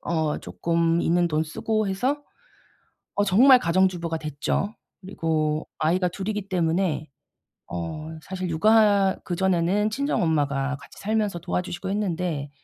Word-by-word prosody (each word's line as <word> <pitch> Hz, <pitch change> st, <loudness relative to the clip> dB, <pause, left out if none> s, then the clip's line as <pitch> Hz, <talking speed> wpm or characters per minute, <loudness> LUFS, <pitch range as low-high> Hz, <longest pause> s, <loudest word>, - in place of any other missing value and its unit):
어 160 Hz, -3 st, -1 dB
쪼끔 170 Hz, 0 st, 0 dB
있는 175 Hz, +1 st, +2 dB
돈 155 Hz, 0 st, 0 dB
쓰고 215 Hz, +7 st, -1 dB
해서 260 Hz, +10 st, -1 dB, 0.9 s
어 205 Hz, -, +3 dB
정말 250 Hz, +7 st, +7 dB
가정주부가 170 Hz, -2 st, +1 dB
됐죠. 155 Hz, +7 st, -2 dB, 0.3 s
그리고 160 Hz, -5 st, -1 dB
아이가 180 Hz, +4 st, +2 dB
2 190 Hz, +3 st, -6 dB
이기 210 Hz, -2 st, -3 dB
때문에 170 Hz, -3 st, 0 dB, 0.6 s
어 90 Hz, -, -5 dB
사실 185 Hz, +1 st, -5 dB
육아 200 Hz, +2 st, +4 dB
그전에는 190 Hz, +3 st, +1 dB
친정엄마가 145 Hz, -, 0 dB
같이 -, -, -15 dB
살면서 210 Hz, -4 st, -1 dB
도와주시고 180 Hz, +2 st, -3 dB
했는데 180 Hz, -7 st, -2 dB
180 Hz, 275 characters per minute, -25 LUFS, 160-200 Hz, 0.9 s, 정말